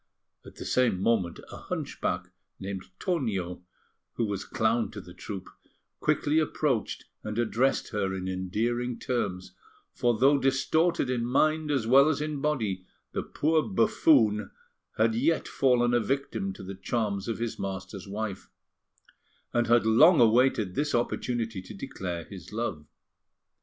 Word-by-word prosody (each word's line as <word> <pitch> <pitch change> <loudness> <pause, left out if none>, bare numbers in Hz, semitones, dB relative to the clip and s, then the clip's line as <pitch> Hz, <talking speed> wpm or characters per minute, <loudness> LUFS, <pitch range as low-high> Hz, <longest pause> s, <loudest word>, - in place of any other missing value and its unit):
At - - -13
the - - -8
same 120 -7 +2
moment, 95 -5 +1
a - - -8
hunchback - - -3 0.3
named 95 -1 -5
Tonio, 100 - -2 0.5
who 115 - 0
was 100 -2 -3
clown 115 +1 +1
to 105 - -8
the 90 -2 -11
troupe, 95 +1 -7 0.5
quickly 155 0 +2
approached 145 -6 -1 0.2
and 105 0 -4
addressed 120 +3 +1
her 100 -3 -1
in 95 0 -4
endearing 115 +7 -1
terms; 100 -8 -3 0.4
for, 120 -3 +1
though 140 +4 +5
distorted 135 +3 +2
in 120 -2 0
mind 155 +5 +2
as 135 -6 +1
well 135 +5 +6
as 145 - 0
in 150 -2 -3
body, 110 -12 -1 0.3
the - - -2
poor 155 +1 +1
buffoon 135 - +3 0.5
had 110 +1 +3
yet 145 +9 +1
fallen 120 -2 +2
a 120 - +4
victim 115 -6 -2
to 95 - -10
the 95 +1 -6
charms 100 0 -2
of 115 - -2
his 115 -1 -4
master's 95 0 -5
wife, 100 -1 -5 1.0
and 120 -1 +2
had 120 -1 +4
long 150 +10 +6
awaited 115 -4 +4
this 145 +6 0
opportunity 120 -3 -1
to 100 +3 -10
declare 90 -3 -5
his 95 -1 -11
love. 105 -10 -3
115 Hz, 145 wpm, -28 LUFS, 100-135 Hz, 1.0 s, well